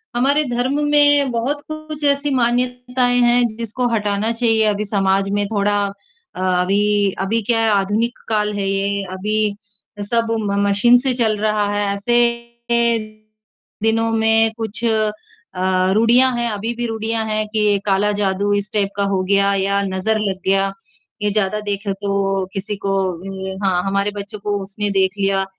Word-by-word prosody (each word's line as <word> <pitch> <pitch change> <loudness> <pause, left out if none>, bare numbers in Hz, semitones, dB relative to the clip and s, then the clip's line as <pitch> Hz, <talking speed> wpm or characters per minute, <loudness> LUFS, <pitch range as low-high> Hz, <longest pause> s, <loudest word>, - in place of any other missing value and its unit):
हमारे 280 +5 +2
धर्म 265 +4 0
में 290 -2 +4
बहुत 260 +6 -2
कुछ 310 -1 -7
ऐसी 280 +1 +2
मान्यताएँ 245 0 +1
हैं, 240 0 +4
जिसको 235 +2 -2
हटाना 210 +1 -1
चाहिए 225 -2 +2
अभी 210 +1 -3
समाज 195 -1 +1
में 205 - 0
थोड़ा 205 -1 0
अ, 370 - -14
अभी 195 +2 +2
अभी 225 +4 0
क्या 225 +2 +1
है 225 - +2
आधुनिक 205 +4 0
काल 210 -1 0
है 195 -1 -1
ये, 200 0 -1
अभी 210 +2 -1 0.6
सब 230 -1 +1
म 200 -1 -2 0.2
मशीन 240 +5 +5
से 265 0 +1
चल 220 -4 +1
रहा 210 0 0
है, 205 0 0
ऐसे 225 +4 0 0.5
अ, 225 -2 0 0.6
दिनों 225 0 +1
में 225 0 +3
कुछ 225 0 -5
अ, 220 -1 +1 0.8
रूड़ियाँ 240 +5 +4
हैं, 240 0 -1
अभी 215 +3 -3
भी 240 - -3
रूड़ियाँ 225 0 -2
हैं 215 0 -1
कि 210 -2 +2
काला 205 +1 +2
जादू 200 +1 0
इस 205 +1 -1
टाइप 200 -2 +1
का 200 - +1
हो 190 - +1
गया 200 0 +3
या 200 +1 +1
नज़र 195 +3 -1
लग 195 -3 -2
गया, 195 0 +2 0.5
ये 210 0 0
ज़्यादा 210 0 0
देखें 200 -1 -3
तो 195 -1 -1
किसी 205 +1 -3
को 195 - +1 0.2
उम, 190 +2 -7
हाँ, 180 -2 +1
हमारे 200 +1 0
बच्चों 205 +1 -7
को 205 0 -2
उसने 205 +1 -3
देख 190 -1 +2
लिया, 195 0 +1
210 Hz, 165 wpm, -19 LUFS, 200-235 Hz, 0.8 s, मशीन